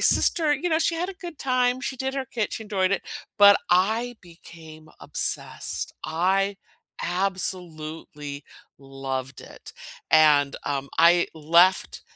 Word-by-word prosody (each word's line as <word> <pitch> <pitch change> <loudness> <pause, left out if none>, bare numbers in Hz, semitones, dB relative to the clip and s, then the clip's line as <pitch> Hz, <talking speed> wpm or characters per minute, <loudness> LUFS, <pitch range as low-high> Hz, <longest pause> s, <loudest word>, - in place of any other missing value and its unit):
sister, 315 -3 +3
you 295 +6 -2
know, 315 - +3
she 335 - +1
had 355 +2 -2
a - - -10
good 350 -5 -9
time, 255 -1 +1
she 265 - -3
did 265 +2 -3
her 270 -1 -3
kit, 225 -4 -3
she 220 - -6
enjoyed 195 -2 0
it, - - -1 0.4
but 200 0 +8
I 220 +7 +2
became 160 -2 -14
obsessed. - - -4
I 190 +5 0 0.5
absolutely 160 -6 -4 0.3
loved 135 -1 -6
it, - - -13 0.4
and, 150 -3 +5
um, 140 -1 -3
I 175 +1 +5
left 170 +4 +3
185 Hz, 135 wpm, -24 LUFS, 155-240 Hz, 0.5 s, but